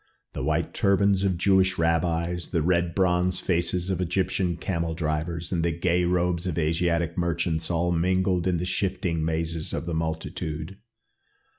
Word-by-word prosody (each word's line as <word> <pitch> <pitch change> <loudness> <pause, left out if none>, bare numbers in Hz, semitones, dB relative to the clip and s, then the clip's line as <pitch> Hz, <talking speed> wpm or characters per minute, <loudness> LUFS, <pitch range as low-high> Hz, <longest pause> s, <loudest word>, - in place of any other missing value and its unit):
The - - -4
white - - 0
turbans 100 0 +2
of 95 -3 +1
Jewish 95 0 +3
rabbis, 85 +1 0
the 85 -4 0
red 85 0 +1
bronze 90 -1 +2
faces 90 +1 0
of 95 -1 -1
Egyptian 90 -1 0
camel 85 -2 -2
drivers, 80 +1 -2
and 85 -3 0
the 85 - +1
gay 85 +2 +1
robes 90 0 0
of 85 - -2
Asiatic 85 +1 0
merchants 85 -1 -1
all 85 0 +1
mingled 90 +1 +1
in 90 -2 +2
the 85 - -2
shifting 95 -3 -1
mazes 80 0 -2
of - - -3
the 85 - -3
multitude. 80 +2 -4
85 Hz, 155 wpm, -26 LUFS, 80-90 Hz, -, Jewish